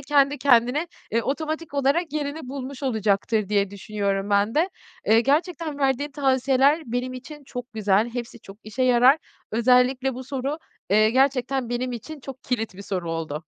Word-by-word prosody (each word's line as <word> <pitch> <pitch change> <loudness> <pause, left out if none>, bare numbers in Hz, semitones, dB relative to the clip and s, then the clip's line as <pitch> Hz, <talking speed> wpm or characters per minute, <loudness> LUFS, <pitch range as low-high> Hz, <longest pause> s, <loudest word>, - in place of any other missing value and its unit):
kendi 285 0 +2
kendine, 255 +4 +3 0.2
eee, 230 +1 +1
otomatik 315 +2 -3
olarak 285 +4 +1
yerini 290 -2 -3
bulmuş 270 0 -6
olacaktır 215 -3 +1
diye 200 -2 +1
düşünüyorum 200 0 -2
ben 200 +2 +2
de. 335 +5 +3 0.4
Eee, 225 +1 +6
gerçekten 310 +2 0
verdiğin 275 +1 +1
tavsiyeler 270 +2 +2
benim 245 +2 -2
için 285 +3 -10
çok 245 -2 -7
güzel, 215 +1 +2
hepsi 240 -2 -6
çok 195 -1 -12
işe 225 +4 -3
yarar. 255 +4 +5 0.3
Özellikle 250 +3 +3
bu 255 +1 -7
soru, 275 +3 -3 0.3
eee, 215 +2 +5
gerçekten 265 -1 +1
benim 245 +1 -2
için 285 +6 -7
çok 265 0 -9
kilit 225 -6 -2
bir 200 - -9
soru 180 -4 -3
oldu. 160 -1 -4
255 Hz, 160 wpm, -24 LUFS, 220-280 Hz, 0.4 s, Eee